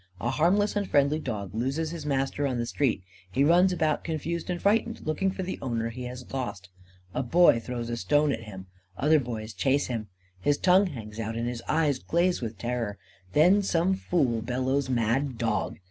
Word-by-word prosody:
A 120 - -1
harmless 195 +9 +2
and 200 -2 -1
friendly 145 +2 +3
dog 100 - -5
loses 135 +8 -1
his 160 -3 -6
master 135 +1 0
on 130 -2 -2
the 120 - -1
street. 115 -6 0 0.3
He 135 +7 +2
runs 175 +5 +5
about, 160 -4 0
confused 165 +2 -3
and 175 -1 -1
frightened, 225 +4 +1
looking 155 +5 0
for 190 0 -4
the 185 - -4
owner 115 -3 -2
he 125 +2 -7
has 125 +1 -8
lost. 100 -7 -4 0.4
A - - 0
boy 150 0 +5
throws 120 0 -5
a - - -1
stone 145 +4 +2
at 115 - -3
him. 95 -3 -9 0.3
Other 155 +2 +4
boys 115 -4 -5
chase 135 +9 +1
him. 115 -4 -4 0.3
His 145 +9 +2
tongue 190 +2 +4
hangs 110 -8 -8
out, 110 0 -3
and 115 +1 -2
his 120 -1 -4
eyes 150 -4 +2
glaze 175 +2 +1
with 115 -2 -5
terror. 115 -1 -3 0.4
Then 180 +7 +5
some 185 -1 +1
fool 140 -11 0
bellows: 130 +3 -1
"Mad 125 +2 0
dog!" 110 -4 -1
135 Hz, 190 wpm, -27 LUFS, 115-165 Hz, 0.4 s, runs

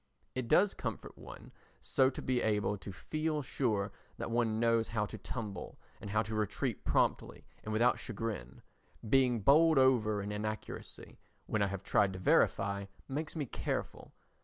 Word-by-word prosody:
It 130 -2 -3
does 195 - +4
comfort - - -5
one - - -11 0.3
so 130 0 +3
to 130 - -7
be 130 -1 +1
able 105 -1 +1
to 100 0 -8
feel 155 - -2
sure 110 -7 -1 0.3
that - - -4
one 115 -2 +1
knows 115 -1 +3
how 105 -2 -1
to - - -8
tumble 105 -7 -6 0.2
and 105 - -7
how 105 +2 +2
to 110 +1 -6
retreat 105 -2 -2
promptly - - 0 0.2
and 110 - -5
without 120 +3 +3
chagrin. 110 - -5 0.4
Being 125 -2 +3
bowled 155 +6 +6
over 120 -6 +4
in 105 - -4
inaccuracy, 110 +1 -6 0.3
when 110 - -1
I 100 - +3
have 100 0 -5
tried 100 -1 +2
to - - -6
verify, 100 +1 +2 0.2
makes 155 +4 -4
me 150 -3 -2
careful. - - -4
110 Hz, 160 wpm, -33 LUFS, 105-130 Hz, 0.4 s, bowled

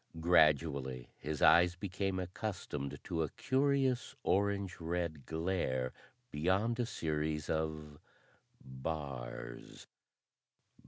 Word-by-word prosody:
Gradually, 75 -6 +3
his 75 0 -3
eyes 85 +1 +7
became 95 +1 -2
accustomed 90 -7 -4
to 80 - -1
a 80 - 0
curious 135 -1 +1
orange 100 -1 +1
red 85 -4 -2
glare 80 -7 -1 0.4
beyond 95 +10 +1
a 120 - +1
series 75 -4 -1
of 75 -2 -3 0.6
bars. 65 -3 -6
80 Hz, 90 wpm, -34 LUFS, 75-95 Hz, 0.6 s, eyes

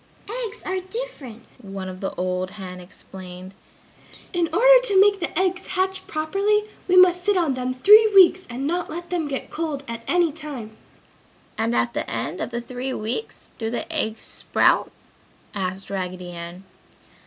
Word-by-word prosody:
"Eggs 445 +3 -11
are 375 0 -1
different!" 370 - -7
one 195 -4 -7 0.3
old 185 0 -1
hen 185 -2 -8
explained. 185 +1 -11 0.8
"In 345 -2 +1
order - - +7
to 400 -5 +4
make 400 0 +5
the 345 - -2
eggs 370 0 0
hatch 380 0 -1
properly, 395 +7 +1 0.2
we 365 - +3
must 360 -1 +6
sit 410 0 +2
on 330 -6 +2
them 255 0 -3
three 425 +11 +7
weeks 370 -1 +7
and 250 +3 -4
not 345 +3 -1
let 345 +2 -7
them 340 -4 -1
get 275 -2 -5
cold 305 -4 -3
at 230 0 -5
any 345 -2 +3
time!" 285 -8 -8 0.8
"And 230 +2 0
at 235 - +1
the - - -3
end - - -3
of - - -2
the 235 0 -4
three 255 +2 -5
weeks 225 - -5
do 225 -1 -2
the 240 - -3
eggs 220 -8 -2
sprout?" - - +2 0.6
asked 190 0 -4
Raggedy 180 -2 -4
Ann. 170 +2 -8
285 Hz, 160 wpm, -23 LUFS, -, 0.8 s, order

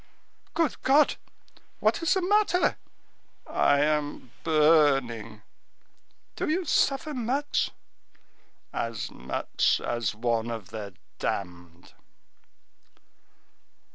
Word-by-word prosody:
"Good 330 -4 0
God! 285 +3 +4 0.6
what - - +1
is 330 - +2
the 380 - 0
matter?" 405 -1 +2 0.7
"I 145 0 +2
am 145 -4 -1
burning!" 135 -9 +2 0.9
"Do - - -2
you 355 +3 0
suffer 290 +1 +1
much?" 265 +4 0 1.0
"As 115 -2 -3
much 65 - 0
as 120 -3 -2
one 115 0 -1
of 110 -5 -6
the 105 -4 -7 0.2
damned." 90 -2 -5
145 Hz, 85 wpm, -27 LUFS, -, 1.0 s, God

